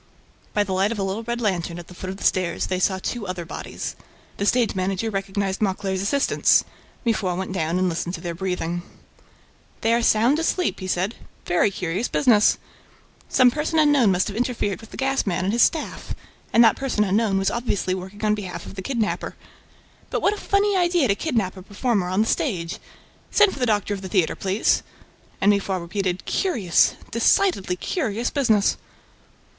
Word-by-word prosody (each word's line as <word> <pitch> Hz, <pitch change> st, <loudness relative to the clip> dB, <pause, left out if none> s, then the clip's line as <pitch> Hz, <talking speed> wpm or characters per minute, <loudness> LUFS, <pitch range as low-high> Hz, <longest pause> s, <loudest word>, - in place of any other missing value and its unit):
By 205 Hz, -, +3 dB
the 190 Hz, -2 st, -4 dB
light 195 Hz, +3 st, +2 dB
of 230 Hz, -, -3 dB
a 200 Hz, -, -1 dB
little 195 Hz, +3 st, -2 dB
red 235 Hz, +1 st, -3 dB
lantern, 180 Hz, -6 st, -1 dB
at 175 Hz, -, -8 dB
the -, -, -12 dB
foot 185 Hz, +1 st, -7 dB
of 190 Hz, -, -5 dB
the -, -, -9 dB
stairs, 180 Hz, -2 st, +1 dB
they 185 Hz, -1 st, -2 dB
saw 190 Hz, +1 st, +2 dB
two 210 Hz, +2 st, -4 dB
other 180 Hz, -2 st, -4 dB
bodies. -, -, -6 dB, 0.4 s
The 200 Hz, -, -1 dB
stage 240 Hz, -1 st, +2 dB
manager 190 Hz, +3 st, -1 dB
recognized 195 Hz, 0 st, -2 dB
Mauclair's 190 Hz, -1 st, -1 dB
assistants. 275 Hz, +8 st, +3 dB, 0.4 s
Mifroid 195 Hz, -6 st, 0 dB
went 190 Hz, 0 st, -4 dB
down 165 Hz, -1 st, 0 dB
and 185 Hz, 0 st, +2 dB
listened 175 Hz, +1 st, -2 dB
to -, -, -9 dB
their 175 Hz, -2 st, -4 dB
breathing. 175 Hz, -1 st, -2 dB, 1.0 s
"They 225 Hz, +1 st, +2 dB
are 235 Hz, -, +2 dB
sound 235 Hz, +6 st, +3 dB
asleep," 350 Hz, +2 st, 0 dB
he 185 Hz, -, -5 dB
said. 185 Hz, +4 st, 0 dB, 0.3 s
"Very 175 Hz, +3 st, +3 dB
curious 190 Hz, +3 st, -2 dB
business! 225 Hz, -6 st, +4 dB, 0.7 s
Some 255 Hz, -2 st, +5 dB
person 310 Hz, +4 st, -1 dB
unknown 290 Hz, -8 st, +5 dB
must 185 Hz, 0 st, +1 dB
have 205 Hz, -, -5 dB
interfered 230 Hz, -4 st, -1 dB
with 225 Hz, -, -13 dB
the -, -, -10 dB
gas 270 Hz, -3 st, 0 dB
man 185 Hz, -1 st, 0 dB
and 195 Hz, +3 st, 0 dB
his 235 Hz, -, +2 dB
staff... 315 Hz, -, 0 dB, 0.4 s
and 235 Hz, -, +6 dB
that 225 Hz, -2 st, +5 dB
person 260 Hz, -6 st, 0 dB
unknown 205 Hz, 0 st, +1 dB
was 195 Hz, 0 st, +1 dB
obviously 230 Hz, -6 st, -1 dB
working 190 Hz, +3 st, -5 dB
on 210 Hz, -, +3 dB
behalf 200 Hz, -4 st, -5 dB
of -, -, -9 dB
the 195 Hz, -, -6 dB
kidnapper... 230 Hz, -1 st, -2 dB, 0.7 s
But -, -, -2 dB
what 405 Hz, -, +4 dB
a -, -, -6 dB
funny 400 Hz, 0 st, +1 dB
idea 350 Hz, -7 st, +2 dB
to -, -, +5 dB
kidnap 215 Hz, -, -1 dB
a 190 Hz, -, -9 dB
performer 205 Hz, 0 st, -1 dB
on 185 Hz, +3 st, +1 dB
the 220 Hz, -, +1 dB
stage!... 175 Hz, -, -1 dB, 0.5 s
Send 420 Hz, -2 st, +4 dB
for -, -, -8 dB
the 250 Hz, -, +1 dB
doctor 210 Hz, -1 st, +1 dB
of 195 Hz, -, -5 dB
the 190 Hz, -, -6 dB
theater, 180 Hz, -4 st, +1 dB
please." 195 Hz, +2 st, +1 dB, 0.6 s
And 205 Hz, -, +5 dB
Mifroid 195 Hz, -2 st, 0 dB
repeated, 180 Hz, +1 st, -3 dB
"Curious, 225 Hz, -, +2 dB, 0.2 s
decidedly 230 Hz, -, +2 dB
curious 235 Hz, -, -2 dB
business!" 220 Hz, -8 st, +2 dB
200 Hz, 190 wpm, -23 LUFS, 185-235 Hz, 1.0 s, and